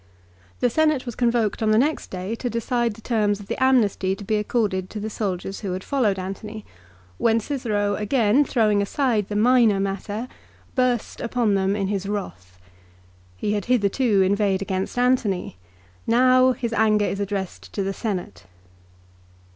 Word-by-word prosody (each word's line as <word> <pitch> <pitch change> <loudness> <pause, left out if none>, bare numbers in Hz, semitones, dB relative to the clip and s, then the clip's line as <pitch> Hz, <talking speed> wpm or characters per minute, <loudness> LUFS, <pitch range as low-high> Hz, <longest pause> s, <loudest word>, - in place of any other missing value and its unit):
The 245 - +3
Senate 305 -2 +2
was 240 - -5
convoked 235 -3 0
on 220 - +2
the 215 - +4
next 295 +6 0
day 185 +3 -4
to 245 - -3
decide 235 0 -1
the 225 - -14
terms 210 -4 +1
of 205 - -10
the 230 - -2
amnesty 210 -7 +2
to 205 - -10
be 215 +2 0
accorded 205 -4 -1
to 215 - -6
the 215 +1 -4
soldiers 195 -2 -3
who 195 -4 -4
had 185 +1 -5
followed 235 -9 +1
Antony, 205 +3 -6 0.5
when 230 -1 +3
Cicero 215 -5 -1
again 215 +4 +2
throwing 215 -6 +2
aside 220 -1 0
the 205 - -3
minor 225 -2 +4
matter, 205 +4 -3 0.5
burst 250 -3 0
upon 235 -3 0
them 195 0 +1
in 200 -2 -1
his 195 0 -2
wrath. 90 - -6 0.8
He 205 - -1
had 205 -2 -2
hitherto 215 -2 +2
inveighed 195 0 +1
against 190 +3 -3
Antony. 245 - +1 0.5
Now 255 +2 +5
his 235 -2 -4
anger 215 -1 +3
is 195 - -2
addressed 190 - -4
to 195 - -1
the 195 +1 -2
Senate. 185 - -5
210 Hz, 165 wpm, -23 LUFS, 195-240 Hz, 0.8 s, Now